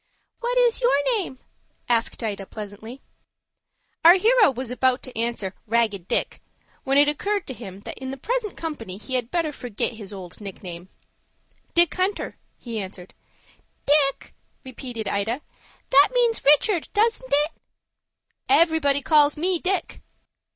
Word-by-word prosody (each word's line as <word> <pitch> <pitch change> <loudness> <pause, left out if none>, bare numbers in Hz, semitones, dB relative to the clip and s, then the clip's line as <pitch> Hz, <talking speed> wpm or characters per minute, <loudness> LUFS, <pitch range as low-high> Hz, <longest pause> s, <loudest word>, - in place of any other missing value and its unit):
"What - - -1
is 485 -1 +3
your 475 - +2
name?" 305 -9 -5 0.5
asked 235 0 0
Ida, 200 -3 -4
pleasantly. 215 +4 -9 1.0
Our 340 +2 +9
hero 445 +2 +5
was 260 -2 -5
about 255 +1 +1
to 255 - -10
answer 225 -4 -2
"Ragged 215 -5 0
Dick," - - -1 0.4
when 270 0 +1
it 290 0 +6
occurred 400 +7 -1
to 260 - -5
him 200 -5 -10
that - - -8
in 260 0 -5
the 270 - -5
present 445 - -2
company 235 - -5
he 220 +5 -7
had 245 -2 0
better 330 -1 0
forget 245 -7 -4
his 210 -3 -10
old 185 -1 -9
nickname. 185 -3 -8 0.9
"Dick 345 -2 +4
Hunter," 375 +2 -2 0.2
he 230 -3 -5
answered. 190 -2 -8 0.7
"Dick!" 285 -1 +2 0.3
repeated 245 -4 -6
Ida. 220 +7 -1 0.5
"That 280 +2 +7
means 475 -2 +2
Richard, 310 +5 +4
doesn't 455 +3 +1
it?" 295 +3 +3 1.0
"Everybody 320 -7 +3
calls 300 -2 +4
me 355 +2 0
Dick." 365 0 -2
275 Hz, 140 wpm, -24 LUFS, 225-345 Hz, 1.0 s, Our